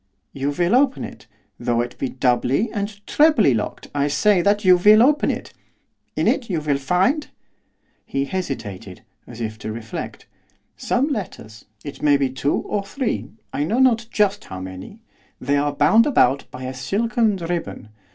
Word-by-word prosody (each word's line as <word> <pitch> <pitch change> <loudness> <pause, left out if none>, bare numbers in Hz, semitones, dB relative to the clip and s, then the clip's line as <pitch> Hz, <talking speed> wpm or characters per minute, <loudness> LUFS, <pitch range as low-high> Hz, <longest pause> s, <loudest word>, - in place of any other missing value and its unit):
'You 140 +1 -2
will 175 +6 0
open 270 +1 +2
it, - - -10 0.3
though 120 -1 0
it 120 +1 -5
be 135 - -2
doubly 130 - +1
and 205 -1 -5
trebly 290 - +4
locked, 110 -2 -4
I 145 0 +1
say 190 +6 +3
that 205 +2 +1
you 185 -1 +8
will 210 +5 +6
open 295 +3 +3
it. - - -4 0.6
In - - 0
it 235 - +1
you 175 -4 0
will 145 -2 -1
find 190 - +1 0.4
' - - -46 0.3
he 135 0 -1
hesitated, 105 - -5 0.2
as 120 -1 -11
if 110 -1 -4
to 110 - -5
reflect 110 -1 -7 0.5
'some 270 +5 0
letters; 140 - -6 0.2
it 145 - -8
may 145 -1 +4
be 135 -2 0
two 135 +2 0
or 205 -1 -3
three, 245 +5 -3 0.2
I 145 - -1
know 210 +10 -1
not 240 -3 +3
just 205 -2 0
how 95 - -8
many, 95 - -9 0.4
they 140 +2 0
are 145 +1 +1
bound 155 - +4
about 140 - +2
by 130 - -9
a 130 +1 -4
silken 215 - 0
ribbon. 170 -9 -5
165 Hz, 170 wpm, -21 LUFS, 130-215 Hz, 0.6 s, you